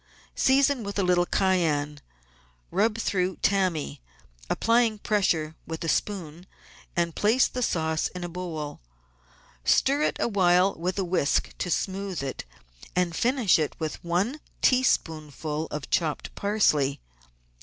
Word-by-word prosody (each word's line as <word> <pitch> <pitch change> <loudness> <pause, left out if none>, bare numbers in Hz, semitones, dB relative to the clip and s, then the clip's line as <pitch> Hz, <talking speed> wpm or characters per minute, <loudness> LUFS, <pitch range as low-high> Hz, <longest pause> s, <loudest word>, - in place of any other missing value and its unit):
Season 270 -1 +3
with 200 0 -5
a 200 - +2
little 180 -1 +2
cayenne; 155 -6 +1 0.7
rub 215 +2 +1
through 190 -4 0
tammy, 185 - 0 0.5
applying 230 -1 +2
pressure 180 -7 0
with 160 0 -5
a - - -3
spoon, 175 -2 -2 0.5
and 170 -1 0
put 225 +5 +3
the 250 - -2
sauce 160 -7 0
in 180 -1 -8
a - - -3
bowl. 165 -4 -5 0.8
Stir 280 - +3
it - - +1
awhile 185 -3 +3
with 180 +4 -3
a 195 - +1
whisk 170 -5 0
to 180 - -2
smooth 190 -2 -2
it, 135 - -5 0.5
and 180 -2 +1
finish 240 -6 +3 0.2
with 155 -2 -5
one 190 - 0 0.2
teaspoonful 155 - +1
of 150 -1 -6
chopped 155 -4 -1
parsley. 155 -10 +1
180 Hz, 125 wpm, -26 LUFS, 160-205 Hz, 0.8 s, Season